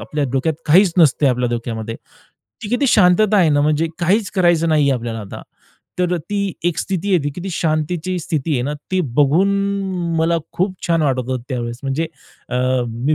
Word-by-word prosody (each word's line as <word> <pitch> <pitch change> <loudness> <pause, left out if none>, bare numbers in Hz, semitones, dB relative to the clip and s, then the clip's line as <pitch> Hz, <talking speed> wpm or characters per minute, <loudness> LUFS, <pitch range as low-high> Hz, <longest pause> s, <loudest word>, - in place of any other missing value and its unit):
आपल्या 150 -1 -2
डोक्यात 135 +4 0
काहीच 175 +3 +5
नसते 150 -2 +4
आपल्या 125 -2 +1
डोक्यामध्ये. 115 -1 -4 0.7
ती 205 - -5
किती 245 +4 +1
शांतता 210 +1 +4
आहे 175 -4 +4
ना 145 -1 +3
म्हणजे 155 +2 +1
काहीच 195 +5 +1
करायचं 175 -3 +3
नाहीये 150 -3 +3
आपल्याला 115 -2 -4
आता, 100 - -9 0.6
तर 180 0 +1
ती 200 -2 -1
एक 175 -2 0
स्थिती 195 +1 -2
आहे 180 - +5
ती 145 - -1
किती 185 +3 -5
शांतीची 165 +3 -1
स्थिती 160 -2 -2
आहे 125 - 0
ना, 145 +3 -2 0.2
ती 185 - +2 0.2
बघून 160 +8 +3 0.7
मला 165 +1 +2
खूप 185 +1 -1
छान 165 -2 +2
वाटत 135 -3 +1
होतं 130 -2 -2
त्यावेळेस. 120 -2 -3
म्हणजे 140 +4 -1 0.4
अ, 125 - -2 0.3
मी 120 +7 -1
160 Hz, 180 wpm, -19 LUFS, 135-180 Hz, 0.7 s, काहीच